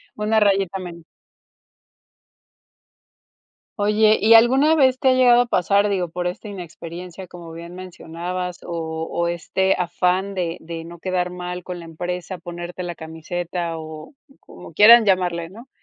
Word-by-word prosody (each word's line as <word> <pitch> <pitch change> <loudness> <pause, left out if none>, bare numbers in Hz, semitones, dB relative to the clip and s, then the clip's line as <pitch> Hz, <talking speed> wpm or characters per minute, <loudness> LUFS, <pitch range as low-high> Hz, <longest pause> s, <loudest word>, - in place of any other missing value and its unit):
Una 215 +1 +1
rayita 195 -2 +1
menos. 170 -2 -9 2.7
Oye, 210 +1 +3
¿y 225 +1 +6
alguna 265 +7 +5
vez 260 -4 +3
te 265 - +2
ha - - +5
llegado 245 -2 +5
a 245 - +2
pasar, 200 0 +2
digo, 185 -4 -1
por 175 +1 -4
esta 180 +5 -5
inexperiencia, 180 -1 -9
como 170 -2 -11
bien 170 +1 -9
mencionabas, 180 0 -6
o - - -8 0.4
o 170 0 -1
este 180 +3 0
afán 180 +2 0
de 175 -2 -3
de 165 0 -7
no 170 +1 -11
quedar 180 0 -2
mal 180 0 -6
con 180 -1 -6
la 170 - -10
empresa, 180 +3 -5
ponerte 175 +1 -7
la 175 -1 -5
camiseta 165 +1 -5
o 155 - -9 0.3
como - - -14
quieran 225 +4 +8
llamarle, 175 -3 +1
¿no?, 230 +8 -14
180 Hz, 150 wpm, -21 LUFS, 170-200 Hz, 2.7 s, quieran